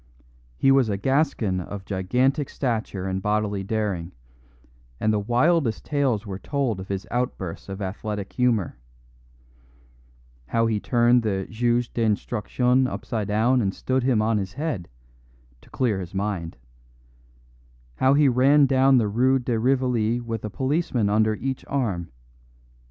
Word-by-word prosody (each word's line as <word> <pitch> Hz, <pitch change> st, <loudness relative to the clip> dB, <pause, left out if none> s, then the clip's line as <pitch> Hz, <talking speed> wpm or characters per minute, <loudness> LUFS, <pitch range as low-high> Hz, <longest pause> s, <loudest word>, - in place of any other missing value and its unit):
He 135 Hz, -, +4 dB
was 135 Hz, -4 st, +4 dB
a 100 Hz, -, -1 dB
Gascon 120 Hz, -6 st, 0 dB
of 95 Hz, +2 st, -7 dB
gigantic 125 Hz, +10 st, 0 dB
stature 110 Hz, -7 st, -3 dB
and 95 Hz, 0 st, -2 dB
bodily 105 Hz, -1 st, -1 dB
daring; 100 Hz, -5 st, -2 dB, 0.9 s
and 110 Hz, -, +1 dB
the 105 Hz, -, +1 dB
wildest 120 Hz, +4 st, +1 dB
tales 135 Hz, -7 st, 0 dB
were 95 Hz, -2 st, -6 dB
told 135 Hz, -7 st, -2 dB
of 95 Hz, -, -7 dB
his 95 Hz, -1 st, -4 dB
outbursts 115 Hz, -9 st, -3 dB
of 95 Hz, +1 st, -5 dB
athletic 105 Hz, +1 st, -5 dB
humour; 115 Hz, -, 0 dB, 1.7 s
how 115 Hz, -, +1 dB
he 110 Hz, -2 st, 0 dB
turned 120 Hz, +2 st, +3 dB
the 95 Hz, -4 st, -1 dB
juge 120 Hz, +1 st, 0 dB
d'instruction 120 Hz, +3 st, +1 dB
upside 110 Hz, -4 st, -4 dB
down 115 Hz, +5 st, +2 dB
and 95 Hz, -3 st, -1 dB
stood 130 Hz, 0 st, -1 dB
him 120 Hz, -4 st, +2 dB
on 110 Hz, -1 st, +1 dB
his 95 Hz, 0 st, -5 dB
head, 140 Hz, -, -3 dB, 0.7 s
"to -, -, -20 dB
clear 115 Hz, -7 st, 0 dB
his 90 Hz, 0 st, -8 dB
mind"; 95 Hz, -6 st, -3 dB, 1.4 s
how 130 Hz, +1 st, +4 dB
he 145 Hz, 0 st, +5 dB
ran 135 Hz, +3 st, +5 dB
down 135 Hz, 0 st, +4 dB
the 115 Hz, -3 st, +2 dB
Rue 125 Hz, +6 st, +3 dB
de 120 Hz, -3 st, -1 dB
Rivoli 120 Hz, -2 st, +1 dB
with 115 Hz, -2 st, -5 dB
a 105 Hz, -, -3 dB
policeman 130 Hz, -4 st, 0 dB
under 110 Hz, +1 st, +2 dB
each 130 Hz, +4 st, -4 dB
arm. 105 Hz, -11 st, -2 dB
115 Hz, 140 wpm, -24 LUFS, 100-130 Hz, 1.7 s, he